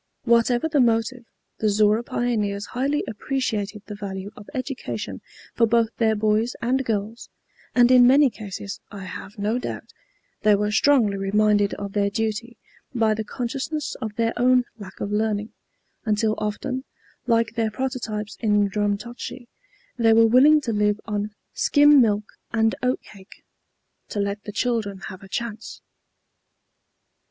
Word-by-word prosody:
Whatever 235 +3 +3
the 300 -2 +1
motive, 230 +1 +1 0.3
the 215 - +2
Zorra 210 +2 +3
pioneers 210 -4 -1
highly 275 +5 -1
appreciated 215 -4 -3
the 210 - -7
value 200 -1 -6
of 205 - -12
education 260 +1 -4 0.3
for 230 - +3
both 230 0 +3
their 220 -2 +2
boys 215 +3 +1
and 260 +3 0
girls, 220 0 -3 0.5
and 245 0 +6
in 250 -1 +7
many 275 +1 +5
cases, 200 -1 -7
I 200 -2 -8
have 185 +3 -8
no 210 +4 0
doubt, - - -6 0.5
they 210 -1 +5
were 210 +1 0
strongly 220 -4 +3
reminded 205 +1 +2
of 200 -1 -6
their 200 -1 +1
duty 225 +3 -3 0.4
by 225 -2 +3
the 220 0 -3
consciousness 265 +7 -4
of 220 -3 -4
their 230 0 0
own 250 +1 +4 0.2
lack 190 -2 -10
of 200 - -3
learning, 210 0 -1 0.5
until 215 -1 +1
often, 255 +5 -3 0.4
like 230 -1 +2
their 225 -1 0
prototypes 220 -3 -4
in 210 -3 +2
Drumtochty, 215 +4 -3 0.5
they 225 -1 +5
were 225 0 +6
willing 275 +7 +6
to 235 -5 -2
live 210 0 +1
on 210 -1 -3 0.2
"skim 290 -1 +5
milk 210 -3 +2 0.3
and 225 -1 +2
oat 255 0 0
cake, 195 0 -16 0.7
to 205 - -3
let 200 0 -2
the 210 - -5
children 215 -4 -1
have 185 +1 -11
a 195 - -12
chance." 225 0 -5
220 Hz, 145 wpm, -23 LUFS, 205-245 Hz, 0.7 s, in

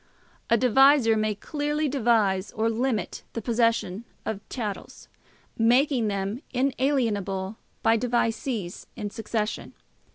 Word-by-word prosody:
A 230 - +5
devisor 255 0 +5
may 215 -1 0
clearly 295 +6 -2
devise 220 -7 +2
or 225 +1 +1
limit 235 -1 -1
the 230 - -3
possession 230 -4 +1 0.2
of 210 -2 -3
chattels, 215 -6 -6 0.5
making 245 +1 +3
them 200 +4 -2
inalienable 230 -7 0 0.3
by 225 0 +4
devisees 230 -4 -1
in 210 -3 -5
succession. 220 -1 -3
230 Hz, 105 wpm, -26 LUFS, 210-255 Hz, 0.5 s, A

